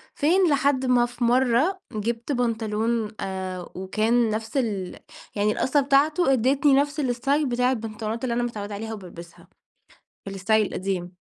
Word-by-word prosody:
فين 350 +4 +3
لحد 280 -2 +2
ما 245 -1 +4
في 240 0 -6
مرة 255 +9 +2
جِبت 230 +5 -3
بنطلون، 225 -2 -1
آآ، 185 -2 -5
وكان 220 +5 +1
نفس 220 +4 -3
ال 205 -8 -2 0.4
يعني 210 0 +2
القَصّة 275 +6 +1
بتاعته 280 +2 +3
ادّيتني 265 +3 +3
نفس 285 +2 +1
الاستايل 275 +3 0
بتاع 250 +1 +1
البنطلونات 225 -1 -4
اللي 245 -2 -1
أنا 240 0 0
متعودة 210 -3 -5
عليها 220 +2 -5
وبالبسها، 175 -4 -11 0.8
الاستايل 210 +2 +1
القديم. 185 -2 -4
235 Hz, 140 wpm, -24 LUFS, 210-265 Hz, 0.8 s, ما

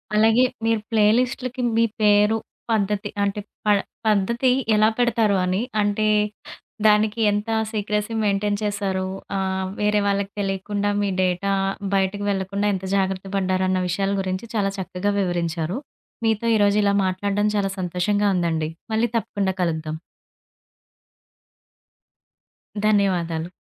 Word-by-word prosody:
అలాగే 225 +3 +5 0.2
మీరు 225 -1 +2
ప్లేలిస్ట్‌లకి 245 +4 +1 0.2
మీ 230 - +5 0.2
పేరు, 210 +1 +4 0.3
పద్ధతి, 210 -2 0
అంటే 200 +1 -1 0.3
ప - - -3 0.4
పద్ధతి 235 +5 +2 0.3
ఎలా 215 +1 +5
పెడతారు 225 -4 +2
అని 185 +4 0 0.2
అంటే, 205 +1 +1 0.8
దానికి 215 +1 +3
ఎంత 205 +2 -2 0.2
సీక్రెసీ 210 +1 -2
మెయింటైన్ 205 0 +1
చేసారో, 200 -2 -1 0.3
ఆహ్, 190 -1 -1
వేరే 210 0 +2
వాళ్ళకి 200 0 0
తెలియకుండా 200 +1 -1
మీ 200 - 0
డేటా 185 +2 0 0.4
బయటకు 195 +1 0
వెళ్లకుండా 200 +1 -1
ఎంత 190 0 -4
జాగ్రత్త 190 0 -1
పడ్డారన్న 185 -1 +1
విషయాల 195 +2 0
గురించి 185 +4 -3
చాలా 195 -2 +1
చక్కగా 190 +1 -2
వివరించారు. 175 0 -1 0.5
మీతో 225 0 +1
ఈరోజు 205 -1 +3
ఇలా 200 0 +3
మాట్లాడడం 200 +3 0
చాలా 195 -1 +1
సంతోషంగా 185 +4 0
ఉందండి. 160 -3 0 0.2
మళ్ళీ 225 +2 +2
తప్పకుండా 200 -4 -1
కలుద్దాం. 160 -2 -1 2.9
ధన్యవాదాలు. 175 -5 +1
200 Hz, 115 wpm, -23 LUFS, 190-210 Hz, 2.9 s, అలాగే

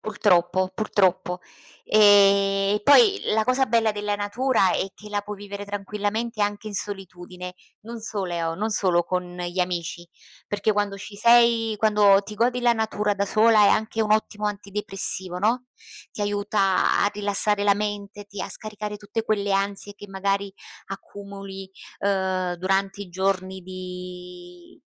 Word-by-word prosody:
Purtroppo, 185 -3 +1
purtroppo. 185 -3 0 0.4
Ehm, 200 -1 +5
e - - -4
poi 400 - +6
la 220 - +3
cosa 255 +2 +2
bella 225 -1 +2
della 205 0 -2
natura 205 0 +1
è - - 0
che 210 - -13
la 205 0 -1
puoi 210 0 -7
vivere 205 0 -7
tranquillamente 210 +3 -3
anche 205 +1 -2
in 205 - -8
solitudine, 180 -2 -6 0.3
non 230 +1 -8
solo 175 -6 -3
non 215 +6 -2
solo 185 -4 +2
con 180 0 -4
gli 175 +1 -5
amici, 175 -1 -3 0.4
perché 205 +1 0
quando 205 -1 -1
ci 200 +1 -9
sei 235 0 +4
quando 210 -2 +4
ti 210 - -8
godi 240 +3 +1
la 240 -1 +4
natura 215 -2 -1
da 200 0 0
sola 215 +1 +5
è - - +6
anche 220 +2 0
un 210 -1 +1
ottimo 215 -1 0
antidepressivo, 195 -2 -4
no, 235 +6 0 0.5
ti - - -8
aiuta 205 -1 +1
a 205 - +2
rilassare 205 0 +2
la 200 -1 +5
mente, 205 0 -5
ti 200 -1 -9
a - - -4
scaricare 210 -1 -6
tutte 210 +2 -4
quelle 205 -2 0
ansie 200 +1 -1
che 205 - -11
magari 195 +1 -2 0.3
accumuli, 195 -1 -9 0.3
uhm, 190 -2 0
durante 195 +2 -1
i 195 - -11
giorni 190 +1 -2
di 180 -1 -10
200 Hz, 150 wpm, -24 LUFS, 190-210 Hz, 0.5 s, poi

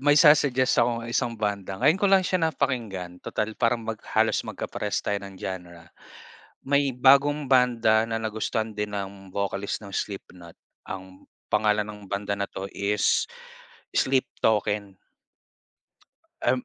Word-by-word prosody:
may 145 +1 +4
sa-suggest 140 -5 +5
akong 115 0 +1
isang 120 0 -1
banda. 100 -3 -2
Ngayon 150 - +3
ko 205 - +4
lang 190 -1 +5
siya 180 -3 +1
napakinggan 100 - -3
total 110 +1 -3
parang 115 0 +1
mag 110 -1 -4 0.2
halos - - +3
magkaparehas - - -3
tayo 100 -1 -1
ng 100 -1 -10
genre. 90 -3 -7 0.8
May 140 0 +2
bagong 140 +3 +4
banda 120 -4 +4
na 115 0 -2
nagustuhan 110 0 -2
din 105 0 -3
ng 100 -1 -6
vocalist 100 0 -2
ng 100 - -9
Slipknot 90 -4 -6 0.3
ang 95 0 -8 0.3
pangalan 105 -1 +2
ng 105 -1 -9
banda 100 0 -1
na 100 0 -2
'to 95 +1 -5
is 100 +1 +1 0.7
Sleep 130 -1 +2 0.2
Token. 105 -2 +1 1.5
Em 130 -1 +1
110 Hz, 135 wpm, -26 LUFS, 100-130 Hz, 1.5 s, sa-suggest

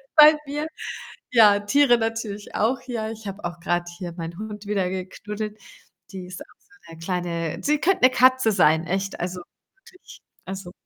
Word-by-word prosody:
bei 305 0 +9
mir. 295 +2 -3 0.6
Ja, 210 -4 +6
Tiere 245 +4 +4
natürlich 225 -2 -4
auch. 240 +4 +1
Ja, 220 -3 -3
ich 220 -2 -8
habe 195 0 -7
auch 175 -1 -5
grad 175 0 -1
hier 175 -2 -6
meinen 170 0 -7
Hund 210 -1 -7
wieder 195 -3 0
geknuddelt. 210 +3 -6 0.5
Die 185 -2 -7
ist 180 0 -9
auch - - -8
so - - -34 0.2
'ne - - -12
kleine 170 -2 -3
Sie 300 +1 +2
könnt 380 +3 +2
'ne 255 - +8
Katze 255 -2 +4
sein, 160 -3 +3
echt. 195 +1 -2
Also, 180 0 -4 0.5
wirklich. 370 - -16 0.2
Also, 190 -1 -7
205 Hz, 170 wpm, -24 LUFS, 180-230 Hz, 0.6 s, bei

